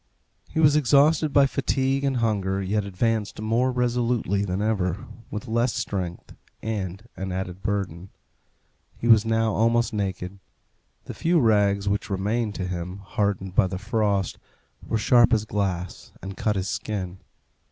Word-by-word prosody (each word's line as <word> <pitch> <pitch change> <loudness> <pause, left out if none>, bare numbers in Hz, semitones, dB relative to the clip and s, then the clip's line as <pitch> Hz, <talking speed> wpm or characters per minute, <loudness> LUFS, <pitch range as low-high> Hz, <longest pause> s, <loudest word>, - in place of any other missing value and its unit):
He - - -2
was 150 -2 +5
exhausted 150 +2 +4
by 140 0 +6
fatigue 135 0 0
and 135 -2 +1
hunger, 100 -4 0
yet 100 +2 -1
advanced 105 +2 -1
more 115 +4 +1
resolutely 120 -5 0
than 95 -1 -2
ever, 100 -3 -1 0.2
with 110 +4 -6
less 115 +1 +1
strength 90 -3 -4 0.3
and 100 -1 -4
an 95 0 -4
added 90 0 -4
burden. 95 -3 -3 0.9
He 120 - -3
was 110 -2 +6
now 115 -1 +1
almost 115 +2 +2
naked. 95 -2 -3 0.7
The - - -6
few 170 +1 +2
rags 100 -4 +3
which 100 +1 -1
remained 105 +3 -1
to 95 - -3
him, 90 +2 -5
hardened 100 -2 -1
by 95 -1 +4
the 95 0 -4
frost, 105 -3 0 0.4
were 115 - -2
sharp 120 +2 +5
as 110 -1 +2
glass, 95 -4 -3
and 95 +1 -7
cut 105 0 0
his 95 0 -2
skin. 95 -4 -4
105 Hz, 150 wpm, -25 LUFS, 95-120 Hz, 0.9 s, by